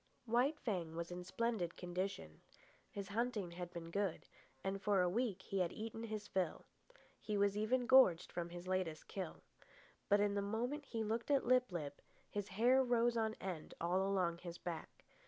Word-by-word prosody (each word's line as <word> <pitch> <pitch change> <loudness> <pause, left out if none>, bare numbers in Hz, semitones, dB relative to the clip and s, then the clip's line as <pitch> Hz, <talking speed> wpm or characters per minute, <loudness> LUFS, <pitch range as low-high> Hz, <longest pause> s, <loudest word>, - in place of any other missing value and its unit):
White 250 +6 +2
Fang 175 -8 -2
was 170 +1 -4
in 180 0 -5
splendid 205 -3 -1
condition. 175 - -4 0.5
His 200 0 -6
hunting 215 -4 -1
had 175 0 -5
been 170 -1 -7
good, 200 -2 -1 0.4
and 195 0 -2
for 200 0 +3
a 180 - +4
week 205 -1 0
he 195 - -2
had 180 -1 +2
eaten 225 +1 -5
his 215 -2 -4
fill. 185 -4 -1 0.5
He 210 -1 -2
was 200 0 +3
even 240 +4 +2
gorged 260 -10 +6
from 175 -1 -3
his 175 +1 -8
latest 185 -4 -1
kill. 190 -4 -5 0.7
But 205 0 +6
in 205 0 +3
the 200 - +1
moment 240 +9 -2
he 225 -4 -2
looked 225 +4 -2
at 280 -2 +3
Lip 250 -2 +4
lip 145 -5 -4 0.3
his 205 -1 -2
hair 245 +7 +4
rose 240 -1 +3
on 220 -1 +1
end 180 -5 -5
all 175 +3 +2
along 185 -3 +1
his 175 -1 -7
back. 170 -2 -6
200 Hz, 180 wpm, -39 LUFS, 175-225 Hz, 0.7 s, gorged